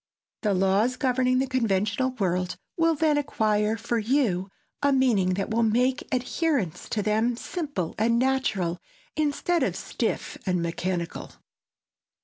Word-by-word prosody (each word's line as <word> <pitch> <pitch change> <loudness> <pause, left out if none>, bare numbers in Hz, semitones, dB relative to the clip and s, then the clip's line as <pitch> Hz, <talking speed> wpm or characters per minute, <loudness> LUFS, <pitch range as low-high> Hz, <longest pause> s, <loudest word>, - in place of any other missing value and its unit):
The 205 -3 +1
laws 195 +6 +2
governing 255 -1 +1
the 265 - +2
conventional 230 -1 +1
world 185 -5 -1 0.2
will 330 -1 +3
then 300 -1 +2
acquire 215 -5 +1
for 235 +2 -1
you 215 -6 +1 0.3
a 285 0 +3
meaning 225 -9 +3
that 195 +2 -3
will 230 +1 +2
make 245 +3 +1
adherence 255 - -1
to 210 - -1
them 220 +3 +1
simple 285 - -4
and 230 +2 +3
natural, 235 -10 0 0.4
instead 310 +3 +1
of - - 0
stiff - - -3
and 180 -2 0
mechanical. 170 0 -3
230 Hz, 130 wpm, -26 LUFS, 195-265 Hz, 0.4 s, will